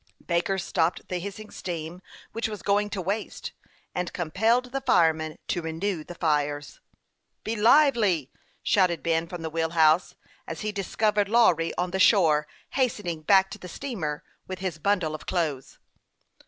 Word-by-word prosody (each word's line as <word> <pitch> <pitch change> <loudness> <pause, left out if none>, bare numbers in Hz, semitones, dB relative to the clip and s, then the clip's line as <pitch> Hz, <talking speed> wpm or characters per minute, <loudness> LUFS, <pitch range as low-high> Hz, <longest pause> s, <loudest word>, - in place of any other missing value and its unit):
Baker 175 +2 0
stopped 175 -2 -1
the 180 - -2
.hissing 200 +3 -7
steam 170 0 -6 0.3
which 230 0 -2
was 210 -2 -7
going 205 +1 +2
to 200 -2 -3
waste, 205 +4 -3 0.4
and 180 -1 -2
compelled 225 +9 +1
the 270 - -2
fireman 160 -8 +2
to 175 - 0
renew 165 +2 -3
the 175 - -10
fires. 145 -3 -1 0.3
" - - -51
Be 220 - -2
lively! 220 - +4 0.2
" - - -38
shouted 180 -4 +2
Ben, 165 0 +1
from 175 -1 -7
the 160 - -3
wheel 165 0 0
house, 160 +2 +4 0.3
as 165 -1 -6
he 215 - -2
discovered 205 +1 0
Lawry 185 -8 +4
on 180 0 -1
the 190 - -2
shore, 160 -7 +4 0.2
hastening 210 - -1
back 190 +4 +4
to - - -8
the 180 - -9
steamer 170 - -4 0.2
with 185 - -5
his 185 -4 -4
bundle 185 -3 +1
of 155 - -8
clothes. 150 -7 -2
180 Hz, 165 wpm, -26 LUFS, 160-205 Hz, 0.4 s, lively